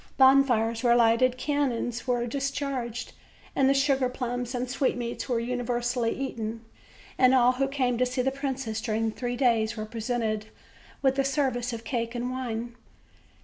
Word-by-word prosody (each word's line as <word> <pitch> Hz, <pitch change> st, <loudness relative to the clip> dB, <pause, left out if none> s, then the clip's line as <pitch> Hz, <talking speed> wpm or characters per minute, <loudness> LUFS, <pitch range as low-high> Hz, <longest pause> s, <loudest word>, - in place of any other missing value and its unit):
Bonfires 255 Hz, -4 st, +4 dB
were 240 Hz, -1 st, +4 dB
lighted, 240 Hz, +2 st, +4 dB
cannons 255 Hz, -4 st, -1 dB
were 245 Hz, -1 st, +1 dB
discharged, 270 Hz, -2 st, -3 dB, 0.4 s
and 275 Hz, 0 st, +4 dB
sugar 275 Hz, -2 st, +2 dB
plums 245 Hz, -1 st, -3 dB
and 250 Hz, +1 st, -2 dB
sweetmeats 245 Hz, -2 st, -2 dB
were 240 Hz, -2 st, +1 dB
universally 240 Hz, 0 st, -1 dB
eaten; 230 Hz, -4 st, -4 dB, 0.5 s
and 255 Hz, 0 st, +6 dB
all 250 Hz, -1 st, +5 dB
who 270 Hz, +2 st, 0 dB
came 255 Hz, -3 st, 0 dB
to 255 Hz, -, +4 dB
see 250 Hz, 0 st, -1 dB
the 265 Hz, -, +1 dB
princess 265 Hz, -5 st, -3 dB
during 225 Hz, 0 st, 0 dB
three 245 Hz, +2 st, -3 dB
days 235 Hz, -3 st, +2 dB
were 215 Hz, -, -3 dB
presented 220 Hz, -1 st, -2 dB, 0.6 s
with 265 Hz, 0 st, +2 dB
a -, -, +4 dB
service 265 Hz, -3 st, 0 dB
of 230 Hz, -1 st, -6 dB
cake 230 Hz, 0 st, -3 dB
and 245 Hz, +1 st, -2 dB
wine. 240 Hz, -2 st, -4 dB
245 Hz, 150 wpm, -27 LUFS, 230-265 Hz, 0.6 s, and